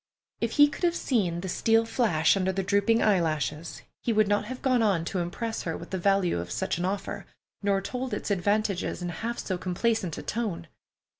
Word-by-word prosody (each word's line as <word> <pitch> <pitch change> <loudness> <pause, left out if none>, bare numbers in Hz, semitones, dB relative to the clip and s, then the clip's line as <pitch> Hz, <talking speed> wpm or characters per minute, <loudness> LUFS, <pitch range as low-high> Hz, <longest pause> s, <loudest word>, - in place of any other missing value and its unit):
If 230 -1 -1
he 290 0 +7
could 295 - -8
have 345 -1 +3
seen 185 - 0
the 190 - -4
steel 225 +5 +2
flash 205 -10 +2
under 190 -1 +1
the 190 +1 -2
drooping 200 +4 +2
eyelashes, 165 -5 0 0.2
he 235 - 0
would 215 -1 +3
not 205 +1 +1
have 255 +3 -7
gone 255 -3 +3
on 195 -7 +2
to 185 - -2
impress 220 +6 -3
her 165 - -3
with 170 - -10
the 190 - -2
value 195 - +2
of 85 - -5
such - - -2
an 175 - 0
offer, 195 +2 -3 0.3
nor 200 -1 +1
told 255 +3 -4
its - - -3
advantages 200 -1 0
in 175 - -2
half 225 +8 -4
so 185 -2 -3
complacent 185 -1 -1
a - - -6
tone. 200 -8 -3
200 Hz, 205 wpm, -27 LUFS, 175-225 Hz, 0.3 s, he